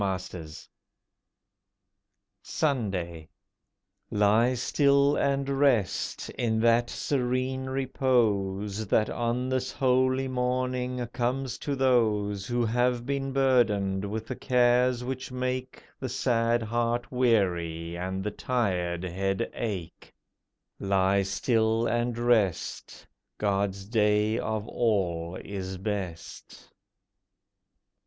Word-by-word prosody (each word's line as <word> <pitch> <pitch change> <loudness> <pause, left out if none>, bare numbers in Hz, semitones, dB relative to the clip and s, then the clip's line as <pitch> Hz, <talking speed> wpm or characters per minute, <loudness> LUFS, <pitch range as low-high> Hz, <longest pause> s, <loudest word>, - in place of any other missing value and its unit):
POEMS 95 -2 -1
OF - - -11
THE 90 - -6
WEEK 75 - -12 1.7
SUNDAY 95 - -2 0.8
Lie 105 +4 +3
still 140 +3 +3
and 140 0 0
rest, 135 -9 +1
in 110 -2 -1
that 120 +1 +3
serene 130 0 -1
repose 110 -6 0
That 110 +2 +2
on 120 +2 -1
this 130 0 -1
holy 130 0 +2
morning 125 0 -1
comes 125 +1 -2
to 145 - -2
those 105 -6 +1
Who 120 -1 0
have 120 +1 +1
been 135 0 -2
burdened 110 -8 +2
with 105 +2 -4
the 130 - -5
cares 125 0 +2
which 130 +1 -5
make 130 0 -3 0.2
The 130 - -4
sad 120 -1 +1
heart 120 +2 -1
weary 85 -9 +1
and 95 +2 -3
the 105 - -2
tired 90 -8 -1
head 95 +4 -2
ache. 95 -8 -5 0.7
Lie 95 0 +2
still 110 +3 +1
and 120 0 0
rest— 115 -7 0 0.3
God's 100 -1 -1
day 105 0 +2
of 110 0 -3
all 90 -8 0
is 95 -2 -5
best. 95 -4 -6
115 Hz, 105 wpm, -27 LUFS, 100-125 Hz, 1.7 s, Lie